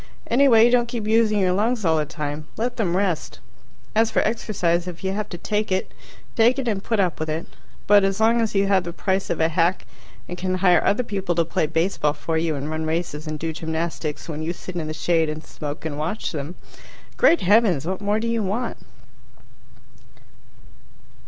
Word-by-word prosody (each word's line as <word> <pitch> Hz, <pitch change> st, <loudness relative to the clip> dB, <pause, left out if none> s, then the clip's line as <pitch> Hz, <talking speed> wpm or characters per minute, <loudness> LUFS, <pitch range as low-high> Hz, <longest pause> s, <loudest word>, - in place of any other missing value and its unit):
Anyway, 235 Hz, -3 st, +5 dB
don't 240 Hz, 0 st, +3 dB
keep 235 Hz, -2 st, -4 dB
using 220 Hz, -1 st, +3 dB
your 185 Hz, -2 st, +2 dB
lungs 215 Hz, +2 st, 0 dB
all 160 Hz, -1 st, +3 dB
the 150 Hz, -1 st, -1 dB
time. 150 Hz, -1 st, -5 dB
Let 245 Hz, +2 st, -2 dB
them 185 Hz, -6 st, 0 dB
rest. 185 Hz, -5 st, -1 dB, 0.6 s
As 225 Hz, +1 st, +3 dB
for -, -, +1 dB
exercise, 180 Hz, -6 st, 0 dB
if 175 Hz, 0 st, -8 dB
you 190 Hz, -, 0 dB
have 210 Hz, +1 st, -3 dB
to 175 Hz, -, -6 dB
take 210 Hz, +3 st, -2 dB
it, 185 Hz, 0 st, -1 dB, 0.4 s
take 240 Hz, +3 st, +4 dB
it 265 Hz, -3 st, -2 dB
and 205 Hz, -3 st, -1 dB
put 225 Hz, -2 st, -1 dB
up 180 Hz, -4 st, +1 dB
with 155 Hz, 0 st, -3 dB
it. 160 Hz, +2 st, -2 dB, 0.4 s
But 205 Hz, -1 st, +6 dB
as 195 Hz, +1 st, 0 dB
long 230 Hz, +1 st, +4 dB
as 220 Hz, -2 st, -1 dB
you 195 Hz, 0 st, +3 dB
have 195 Hz, -2 st, +3 dB
the 170 Hz, -1 st, -6 dB
price 190 Hz, +2 st, -1 dB
of -, -, -1 dB
a 160 Hz, -, +4 dB
hack 170 Hz, +2 st, +1 dB, 0.4 s
and 175 Hz, 0 st, -7 dB
can 185 Hz, 0 st, -1 dB
hire 180 Hz, -2 st, +4 dB
other 220 Hz, +5 st, +2 dB
people 195 Hz, -5 st, -2 dB
to 170 Hz, 0 st, +2 dB
play 160 Hz, -1 st, 0 dB
baseball 160 Hz, -2 st, 0 dB
for 160 Hz, +2 st, -3 dB
you 160 Hz, -1 st, 0 dB
and 140 Hz, +1 st, -4 dB
run 155 Hz, 0 st, -2 dB
races 160 Hz, -2 st, -3 dB
and 155 Hz, 0 st, -3 dB
do 160 Hz, +1 st, -3 dB
gymnastics 160 Hz, -1 st, -4 dB
when 155 Hz, -2 st, -5 dB
you 165 Hz, +2 st, -2 dB
sit 180 Hz, +1 st, -9 dB
in 165 Hz, -3 st, -3 dB
the -, -, -3 dB
shade 165 Hz, -2 st, +1 dB
and 155 Hz, +1 st, -5 dB
smoke 150 Hz, 0 st, -7 dB
and 150 Hz, -2 st, -4 dB
watch 170 Hz, +8 st, -2 dB
them 150 Hz, +2 st, -5 dB, 0.6 s
great 335 Hz, -, +4 dB
heavens, 190 Hz, -, +3 dB
what 190 Hz, +2 st, -3 dB
more 205 Hz, +1 st, +1 dB
do 230 Hz, -, -2 dB
you 230 Hz, -1 st, 0 dB
want? 210 Hz, +5 st, -2 dB
185 Hz, 205 wpm, -23 LUFS, 160-215 Hz, 0.6 s, But